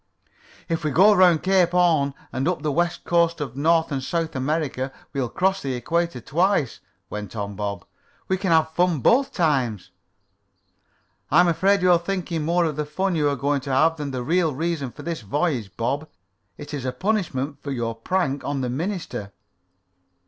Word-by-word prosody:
"If 165 -1 -2
we 155 - +1
go 190 +9 +6
down 205 - +3
around 175 -4 +5
Cape 185 -2 +4
Horn 165 -6 +2 0.2
and 130 +3 -1
up 175 -4 -1
the 150 - 0
west 175 +3 0
coast 170 -1 +2
of 135 -5 -5
North 160 +3 +2
and 135 -2 -2
South 165 +2 -2
America 135 -1 -1 0.2
we'll 130 -4 -1
cross 190 +5 0
the 135 -2 -2
equator 170 +2 -1
twice," 165 - 0 0.3
went 105 0 -6
on 100 -1 -4
Bob. 100 0 -4 0.4
"We 190 - +1
can 190 0 -2
have 160 -1 +3
fun 175 -3 +1
both 270 - +3
times." 135 - 0 1.4
"I'm 175 - +5
afraid 195 +3 +2
you're 180 -2 +5
thinking 170 -3 -3
more 170 +2 +2
of 155 -3 -2
the 150 - 0
fun 185 +6 -1
you 150 -2 +2
are 140 - 0
going 140 +2 0
to 135 - -5
have 160 +5 +3
than 145 -2 -4
the 130 -2 -4
real 165 +1 +1
reason 155 -4 -2
for - - -11
this 165 -5 -4
voyage, 120 - -1
Bob. 145 +7 -2 0.5
It 150 0 -9
is 140 -3 -4
a 130 - -1
punishment 145 -5 -2
for 140 - -6
your 120 -4 -2
prank 140 +4 -1
on 140 -1 -2
the 125 -1 -2
minister." 160 - -4
155 Hz, 185 wpm, -23 LUFS, 135-175 Hz, 1.4 s, go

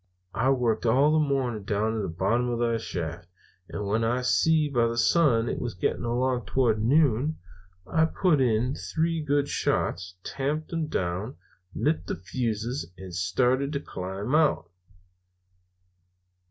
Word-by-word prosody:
"I 130 +4 +1
worked 120 -4 +1
all 135 +6 +4
the 155 - +4
morning 130 -7 -1
down 105 +2 0
at 110 - -1
the - - -2
bottom 100 +9 0
of 120 - -1
the 115 -1 0
shaft, 85 -5 -5 0.4
and 105 - -4
when 110 +3 0
I 120 +3 0
see 160 +4 +3
by 120 -5 +2
the 115 0 -3
sun 120 -4 +3
it - - -2
was 120 -5 -4
getting 90 - -1
along 125 +1 0
towards 120 -5 +2
noon, 140 +3 +2 0.5
I 160 +7 +2
put 160 -3 +2
in 120 +1 +2
three 165 +2 -1
good 145 -1 +1
shots, 90 -7 -1
tamped 150 +4 -3
'em 165 -2 -1
down, 95 - -3 0.4
lit 155 +3 0
the - - -2
fuses, 110 - -3
and 95 -1 -9
started 125 +10 +1
to 140 - -1
climb 95 +1 -5
out. 145 - +2
120 Hz, 155 wpm, -27 LUFS, 105-140 Hz, 0.5 s, all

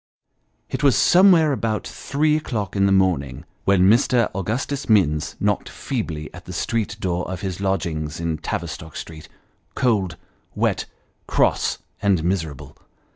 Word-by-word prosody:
It - - -4
was 140 -3 +4
somewhere 175 -4 +6
about 115 -5 -1
three 150 +2 0
o'clock 110 - -3
in 100 0 +3
the - - +2
morning, 85 -10 +1 0.2
when 95 -1 +4
Mr. 120 +1 +3
Augustus 115 +9 -3
Minns 75 -8 +2
knocked - - 0
feebly 80 - -4
at - - -11
the - - -8
street 110 -3 -2
door 90 -3 -2
of 95 - -5
his 95 -1 -4
lodgings 80 -6 -2
in 85 -2 -2
Tavistock 80 0 -5
Street, 80 -1 -8 0.5
cold, 100 -9 +1 0.4
wet, - - 0 0.4
cross, - - +1 0.2
and 100 -6 +2
miserable. 80 -6 -3
95 Hz, 135 wpm, -22 LUFS, 80-115 Hz, 0.5 s, somewhere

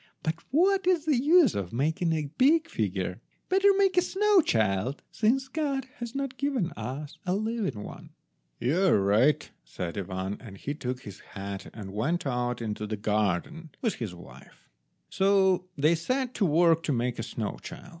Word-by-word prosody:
But 160 +1 -1
what 380 +6 +3
is 350 -4 +3
the 305 -3 +3
use 320 - +6
of 95 -3 -3
making 160 +7 0
a 155 -3 -2
big 315 +5 +5
figure? - - -2 0.3
Better 385 +2 +4
make 390 -2 +3
a - - +7
snow 400 +1 +3
child, 110 - 0
since 260 +5 +1
God 275 -2 -2
has 235 0 -6
not 275 -1 -3
given 265 -11 0
us 140 +4 -6
a 180 0 0
living 215 - -2
one." - - -10 0.5
"You 155 +10 +1
are 170 - +5
right," 105 +9 +3 0.2
said 85 +10 -5
Ivan, 95 +1 -4
and 100 -5 -10
he 145 - -4
took 130 -4 -4
his 100 -6 -10
hat 100 0 -7
and 100 -3 -8
went 160 - -1
out 125 -2 -1
into 105 -1 -3
the 110 0 -3
garden 105 - -1
with 225 - +2
his 105 -6 -5
wife. 85 - -15 0.4
So 190 -2 +3
they 150 +4 +4
set 255 +10 -1
to 200 - +1
work 165 +1 +4
to - - 0
make 120 -1 -1
a - - 0
snow 115 -2 -4
child. 175 - -9
160 Hz, 175 wpm, -28 LUFS, -, 0.5 s, a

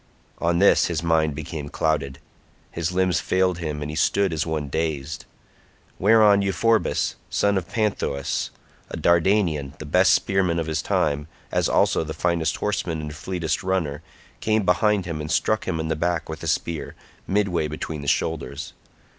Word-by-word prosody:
On 85 0 +1
this 100 +3 +5
his 85 -1 -2
mind 80 -3 +2
became 75 -1 -6
clouded; 70 -4 -1 0.5
his 85 0 -2
limbs 95 0 +2
failed 90 -1 +1
him, 75 -3 -3
and 75 - -4
he - - -6
stood 100 +2 +2
as 80 +1 -1
one 75 -2 -2
dazed; 75 -1 -3 0.7
whereon 105 0 +5
Euphorbus 105 +4 +1
son 100 0 +2
of 90 -4 -2
Panthous 100 -11 -1 0.4
a - - -5
Dardanian, 85 -5 +2
the 75 - -8
best 75 - +4
spearman 95 -3 +1
of 85 - -1
his 80 -1 -1
time, 75 0 0 0.2
as - - +1
also - - +3
the 80 0 -6
finest 85 0 0
horseman 80 -1 -2
and 75 -1 -5
fleetest 85 +1 -2
runner, 85 -6 -1 0.4
came 110 -1 +1
behind 95 +2 +2
him 80 -3 -4
and 75 - -5
struck 110 0 +1
him 85 -3 -1
in 80 - -2
the 80 - 0
back 85 +1 -1
with 80 -1 -7
a - - -5
spear, 85 -2 -2 0.3
midway 95 -5 +1
between 75 0 -5
the 70 - -7
shoulders. 75 -2 -2
80 Hz, 165 wpm, -24 LUFS, 75-95 Hz, 0.7 s, this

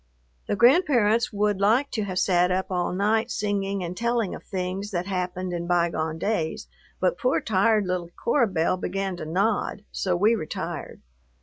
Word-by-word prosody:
The - - 0
grandparents 240 - +4
would 205 -1 0
like 235 +8 +3
to 215 -3 -2
have 185 -2 -4
sat 180 -1 +3
up 185 +1 -1
all 180 -1 0
night 215 +5 +1
singing 200 -3 -1
and 175 +1 -5
telling 235 -1 0
of - - -8
things 190 +2 -4
that 180 -3 -2
happened 185 -1 -3
in 170 0 -3
bygone 170 -2 0
days, 165 -3 -2 0.3
but - - +1
poor 255 0 +2
tired 210 0 +2
little 180 -2 -2
Cora 235 +7 +1
Belle 180 -1 0
began 195 +1 -3
to 155 - -6
nod, 200 +4 0
so 185 -2 -1
we 210 +6 +4
retired. 155 -9 -5
195 Hz, 170 wpm, -25 LUFS, 180-220 Hz, 0.3 s, grandparents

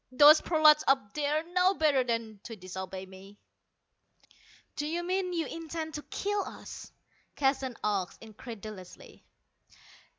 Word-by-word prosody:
Those 295 +4 +8
prolats 310 -2 +5
up 265 -7 +2
there 300 +1 0
know 365 +2 +4
better 295 -5 +3
than 230 -3 -3
to 225 - -7
disobey 190 0 -7
me." 190 +2 -14 1.4
"Do 295 - -2
you 340 +3 -2
mean 365 +1 -1
you 335 -2 -1
intend 325 -1 -6
to 295 - -4
kill 410 +6 -2
us?" - - -10 0.4
Keston 270 -2 0
asked 200 -4 -1
incredulously. 215 -4 -10
270 Hz, 125 wpm, -30 LUFS, 210-315 Hz, 1.4 s, Those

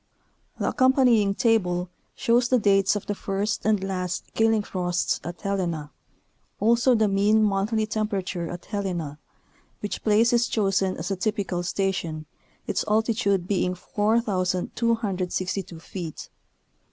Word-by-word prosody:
The - - 0
accompanying 250 -7 +3
table 180 -7 +1 0.3
shows 240 +1 +2
the 255 - +4
dates 195 -2 +3
of 205 - -4
the 205 - -2
first 200 +2 -2
and 210 -3 +2
last 185 -2 -3
killing 225 -1 +2
frosts 180 -3 -1
at 175 +3 -7
Helena, 175 -7 -2 0.7
also 235 +4 +4
the 220 -1 +3
mean 205 +2 +3
monthly 210 +2 +1
temperature 200 -5 -2
at 175 -1 -7
Helena, 175 -8 -3 0.6
which 205 - -4
place 225 +2 +4
is 240 0 +3
chosen 195 -3 +1
as 175 +5 -4
a - - +1
typical 195 -3 -1
station, 175 -4 -2 0.4
its - - -1
altitude 215 -4 +1
being 185 -2 0
4,262 195 -2 -1
feet. 165 -1 -7
200 Hz, 125 wpm, -25 LUFS, 180-220 Hz, 0.7 s, the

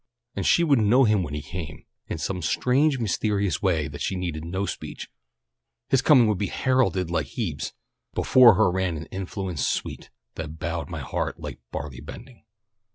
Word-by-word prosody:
And - - -1
she 170 - +5
would 145 -6 +4
know 115 +5 +5
him 105 -4 +3
when 75 -4 -4
he 75 - -4
came, 80 -1 -7 0.2
in - - -4
some 90 +3 -3
strange, 135 - +2
mysterious 105 -4 0
way 85 -7 +1
that 75 0 -6
needed 90 -5 -3
no 95 +4 -2
speech - - -7 0.8
his 135 - +4
coming 130 -6 +6
would 105 -4 +1
be 100 - 0
heralded 95 -10 +1
like 85 - 0
Hebe's: - - -4 0.4
"_Before 125 -5 +7
her 110 -4 +4
ran 90 -2 -1
an 80 - -6
influence 95 -4 -3
sweet, - - -3 0.2
that 80 -1 -6
bowed 85 -2 -3
my - - -5
heart - - -3
like - - -7
barley 70 -4 -5
bending. 125 -4 -11
95 Hz, 170 wpm, -25 LUFS, 80-115 Hz, 0.8 s, Before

